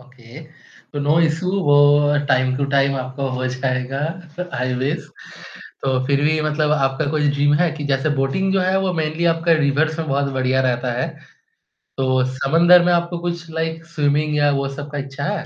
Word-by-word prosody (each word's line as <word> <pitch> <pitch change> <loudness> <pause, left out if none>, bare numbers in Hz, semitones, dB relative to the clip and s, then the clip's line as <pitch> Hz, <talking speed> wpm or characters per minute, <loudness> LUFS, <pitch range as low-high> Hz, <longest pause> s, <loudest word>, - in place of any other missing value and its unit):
Okay, 125 +1 -14 0.5
तो 145 - -4
no 145 +3 +2
issue 165 +3 0
वो 145 -1 +4 0.5
time 130 -1 +2
to 140 - 0
time 140 0 +2
आपका 130 +1 -5
हो 130 0 -2
जाएगा, 130 +1 -2 0.6
आई 125 +1 -1
विश, 145 +5 -2 0.8
तो 130 -1 +1
फिर 140 0 +1
भी 155 +1 +2
मतलब 150 0 0
आपका 135 -2 0
कुछ 155 -1 0
ड्रीम 145 +1 +2
है 175 -2 +2
कि 155 -2 -7
जैसे 135 +3 0
बोटिंग 135 +9 0
जो 195 - +2
है 185 +1 +1
वो 190 -1 -1
मेनली 160 +1 -2
आपका 165 +1 +1
रिवर्स 155 +3 +1
में 160 -1 -3
बहुत 140 0 0
बढ़िया 130 0 +1
रहता 120 0 -2
है, 135 - -1 0.9
तो 130 -1 +1
समुद्र 170 +6 +5
में 180 - +3
आपको 170 0 -1
कुछ 170 -1 -5
लाइक 160 0 -4
स्विमिंग 150 0 +1
या 145 0 +3
वो 135 - -2
सब 145 0 -7
का 145 - -4
इच्छा 140 0 -6
है? - - -7
145 Hz, 185 wpm, -20 LUFS, 135-160 Hz, 0.9 s, समुद्र